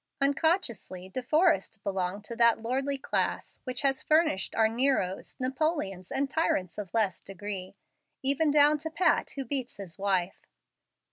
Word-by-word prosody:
Unconsciously 275 Hz, -, 0 dB
De 255 Hz, -, -4 dB
Forrest 300 Hz, -, +2 dB
belonged 195 Hz, +1 st, -2 dB
to 235 Hz, -, -5 dB
that 235 Hz, -1 st, +4 dB
lordly 270 Hz, +5 st, -1 dB
class 270 Hz, -, -1 dB
which 255 Hz, +1 st, -4 dB
has 270 Hz, -1 st, +2 dB
furnished 310 Hz, -, +1 dB
our 220 Hz, -1 st, +4 dB
Neros, 225 Hz, -5 st, 0 dB
Napoleons, 255 Hz, -, -1 dB
and 275 Hz, +1 st, 0 dB
tyrants 210 Hz, -, -1 dB
of 200 Hz, -4 st, -6 dB
less 205 Hz, -5 st, +2 dB
degree, 195 Hz, -1 st, -6 dB, 0.5 s
even 280 Hz, +3 st, +2 dB
down 295 Hz, +1 st, +5 dB
to 320 Hz, +2 st, -4 dB
Pat 330 Hz, 0 st, +2 dB
who 275 Hz, -1 st, -4 dB
beats 260 Hz, -1 st, -2 dB
his 195 Hz, -4 st, -10 dB
wife. 190 Hz, -2 st, -1 dB
250 Hz, 145 wpm, -29 LUFS, 195-285 Hz, 0.5 s, down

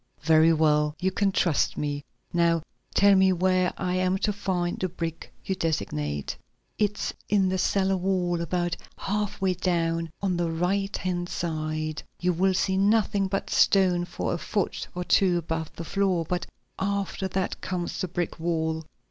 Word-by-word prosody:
"Very 160 Hz, +1 st, +6 dB
well, 150 Hz, -1 st, +3 dB
you 190 Hz, +1 st, +1 dB
can 195 Hz, +1 st, +1 dB
trust 170 Hz, -5 st, +1 dB
me. 145 Hz, -1 st, -2 dB, 0.3 s
Now 170 Hz, -2 st, +3 dB, 0.3 s
tell 200 Hz, 0 st, +6 dB
me 190 Hz, 0 st, +5 dB
where 185 Hz, 0 st, +2 dB
I 180 Hz, -1 st, -1 dB
am 185 Hz, +1 st, +2 dB
to 210 Hz, +2 st, 0 dB
find 180 Hz, -3 st, -1 dB
the 185 Hz, -, -1 dB
brick 165 Hz, -2 st, -5 dB
you 190 Hz, -, 0 dB
designate." 75 Hz, -, -2 dB, 0.4 s
"It's 210 Hz, -1 st, 0 dB, 0.2 s
in 195 Hz, -2 st, +3 dB
the 190 Hz, 0 st, 0 dB
cellar 195 Hz, +1 st, +2 dB
wall, 180 Hz, -2 st, 0 dB
about 175 Hz, +1 st, -1 dB, 0.2 s
half 205 Hz, 0 st, -2 dB
way 190 Hz, -1 st, +2 dB
down 165 Hz, -2 st, 0 dB
on 190 Hz, -3 st, 0 dB
the 170 Hz, -1 st, 0 dB
right 190 Hz, +4 st, 0 dB
hand 175 Hz, -1 st, -2 dB
side. 155 Hz, -2 st, -2 dB, 0.2 s
You 180 Hz, 0 st, +1 dB
will 190 Hz, +2 st, +2 dB
see 190 Hz, 0 st, +1 dB
nothing 205 Hz, 0 st, +3 dB
but 195 Hz, +1 st, -3 dB
stone 180 Hz, -3 st, +4 dB
for -, -, -3 dB
a 170 Hz, -, -2 dB
foot 200 Hz, +2 st, -2 dB
or 180 Hz, -, -2 dB
two 180 Hz, 0 st, +3 dB
above 160 Hz, -1 st, -3 dB
the 170 Hz, -, -6 dB
floor, 190 Hz, -3 st, +1 dB
but 180 Hz, 0 st, -2 dB, 0.3 s
after 200 Hz, -1 st, -1 dB
that 190 Hz, 0 st, -2 dB
comes 180 Hz, -1 st, -3 dB
the 185 Hz, -, -1 dB
brick 175 Hz, -1 st, -3 dB
wall. 160 Hz, -1 st, -1 dB
180 Hz, 165 wpm, -26 LUFS, 165-190 Hz, 0.4 s, Very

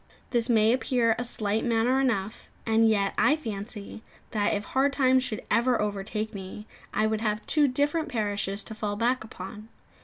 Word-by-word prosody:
This 240 Hz, 0 st, +1 dB
may 220 Hz, -1 st, +4 dB
appear 245 Hz, -3 st, +2 dB
a -, -, -1 dB
slight 220 Hz, -2 st, -1 dB
matter 240 Hz, +2 st, +2 dB
enough; 220 Hz, -5 st, -1 dB, 0.2 s
and 225 Hz, 0 st, +4 dB
yet, 200 Hz, -2 st, +1 dB
I 295 Hz, -, +5 dB
fancy, 215 Hz, -6 st, -6 dB, 0.3 s
that 210 Hz, -2 st, +1 dB
if 205 Hz, -, -2 dB
hard 275 Hz, +1 st, +1 dB
times 260 Hz, -2 st, +3 dB
should 215 Hz, -4 st, -4 dB
ever 240 Hz, +1 st, +3 dB
overtake 210 Hz, +1 st, -3 dB
me, 195 Hz, +1 st, -8 dB, 0.3 s
I 215 Hz, -, +1 dB
would 220 Hz, 0 st, 0 dB
have 215 Hz, -1 st, -1 dB
two 300 Hz, -2 st, +3 dB
different 290 Hz, +5 st, 0 dB
parishes 205 Hz, -3 st, -2 dB
to 220 Hz, -, -8 dB
fall 210 Hz, -1 st, -3 dB
back 240 Hz, +4 st, +1 dB
upon. 210 Hz, +1 st, -9 dB
220 Hz, 175 wpm, -27 LUFS, 210-250 Hz, 0.3 s, I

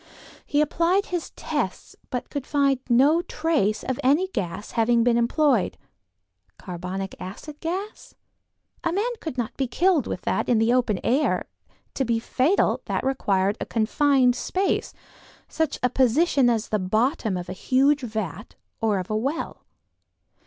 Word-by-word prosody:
He 290 Hz, -, +2 dB
applied 340 Hz, +6 st, +2 dB
his 350 Hz, -3 st, -4 dB
tests -, -, -3 dB
but 250 Hz, -, -4 dB
could 285 Hz, -3 st, -4 dB
find 275 Hz, -2 st, +2 dB
no 280 Hz, +8 st, +5 dB
trace 305 Hz, -, 0 dB
of 260 Hz, -1 st, -3 dB
any 300 Hz, +9 st, +3 dB
gas 180 Hz, -, -4 dB
having 230 Hz, 0 st, +3 dB
been 240 Hz, 0 st, +3 dB
employed. 240 Hz, -, +2 dB, 0.8 s
Carbonic 185 Hz, +2 st, -5 dB
acid 290 Hz, +11 st, -8 dB
gas? 375 Hz, +6 st, -5 dB, 0.7 s
A 335 Hz, -, +1 dB
man 415 Hz, +8 st, 0 dB
could 315 Hz, -9 st, -6 dB
not 240 Hz, -3 st, -3 dB
be 270 Hz, -, 0 dB
killed 340 Hz, 0 st, +2 dB
with -, -, -4 dB
that -, -, -1 dB
in 240 Hz, -, +4 dB
the 225 Hz, +2 st, +3 dB
open 240 Hz, -6 st, +1 dB
air; 270 Hz, +6 st, +1 dB, 0.5 s
to 270 Hz, -, 0 dB
be 235 Hz, -2 st, +1 dB
fatal 260 Hz, -, +1 dB
that -, -, -2 dB
required 200 Hz, -6 st, +1 dB
a -, -, -1 dB
confined 250 Hz, +2 st, +3 dB
space, 375 Hz, +9 st, -1 dB, 0.6 s
such 320 Hz, -3 st, -1 dB
a 250 Hz, -, +4 dB
position 265 Hz, +1 st, +3 dB
as 230 Hz, -2 st, 0 dB
the 215 Hz, -, +1 dB
bottom 215 Hz, -, 0 dB
of 175 Hz, -, -6 dB
a -, -, -5 dB
huge 275 Hz, +8 st, +2 dB
vat 215 Hz, -, -5 dB, 0.3 s
or 215 Hz, -3 st, +2 dB
of 185 Hz, +2 st, -4 dB
a -, -, 0 dB
well. 275 Hz, +9 st, -3 dB
255 Hz, 150 wpm, -24 LUFS, 220-300 Hz, 0.8 s, no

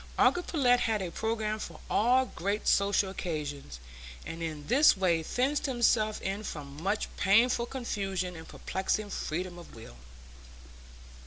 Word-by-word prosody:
Uncle 355 Hz, -, +4 dB
Pullet 255 Hz, -8 st, +2 dB
had 220 Hz, -3 st, +1 dB
a 180 Hz, -3 st, -4 dB
programme 220 Hz, +1 st, -2 dB
for -, -, -7 dB
all 250 Hz, +4 st, +3 dB
great 205 Hz, -2 st, -3 dB
social 200 Hz, -1 st, +3 dB
occasions, 145 Hz, -, -5 dB, 0.5 s
and 165 Hz, 0 st, -7 dB
in 155 Hz, -3 st, -5 dB
this 270 Hz, 0 st, +5 dB
way 175 Hz, -4 st, +2 dB
fenced 265 Hz, -, 0 dB
himself 230 Hz, -4 st, +2 dB
in 195 Hz, +2 st, -2 dB
from 145 Hz, -5 st, -7 dB
much 200 Hz, +4 st, -1 dB
painful 235 Hz, +4 st, +3 dB
confusion 195 Hz, -8 st, -3 dB
and 160 Hz, 0 st, -10 dB
perplexing 200 Hz, +2 st, -2 dB
freedom 175 Hz, +2 st, -4 dB
of 170 Hz, -, -13 dB
will. 110 Hz, -, -12 dB
200 Hz, 140 wpm, -30 LUFS, 170-235 Hz, 0.5 s, this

